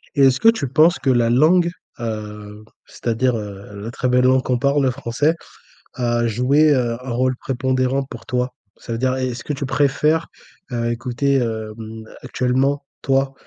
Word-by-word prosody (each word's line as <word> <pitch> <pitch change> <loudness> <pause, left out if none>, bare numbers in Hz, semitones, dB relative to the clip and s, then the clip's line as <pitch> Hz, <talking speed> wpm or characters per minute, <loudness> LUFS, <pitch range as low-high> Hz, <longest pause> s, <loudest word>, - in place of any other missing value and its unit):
Et 140 - +2
est-ce 135 -1 +5
que 225 - +6
tu 225 -12 0
penses 155 +6 +4
que 135 - 0
la 120 -2 +3
langue, 165 +8 +4 0.3
heu, 105 -2 -6 0.2
c'est-à-dire, 120 +2 -1
heu, 100 -1 -8
la 115 - -5
très 125 0 -1
belle 125 0 +3
langue 130 0 +4
qu'on 125 - 0
parle, 140 +1 +2
le 130 - +2
français 140 +5 0 0.6
a 120 -2 0
joué, 140 +7 +3
heu, 120 -3 +1
un 130 - -5
rôle 130 +2 +1
prépondérant 130 +1 0
pour 115 - -10
toi? 125 -2 -1 0.3
Ça - - -9
veut - - -2
dire, 130 0 +1
est-ce 125 -2 -3
que 150 - -3
tu 140 0 -4
préfères, 150 +4 +1 0.4
heu, 120 -1 -1
écouter, 125 +4 -1
hem, 110 -1 -4 0.2
actuellement, 130 +3 0 0.2
toi, 135 0 +1
130 Hz, 175 wpm, -20 LUFS, 120-140 Hz, 0.6 s, que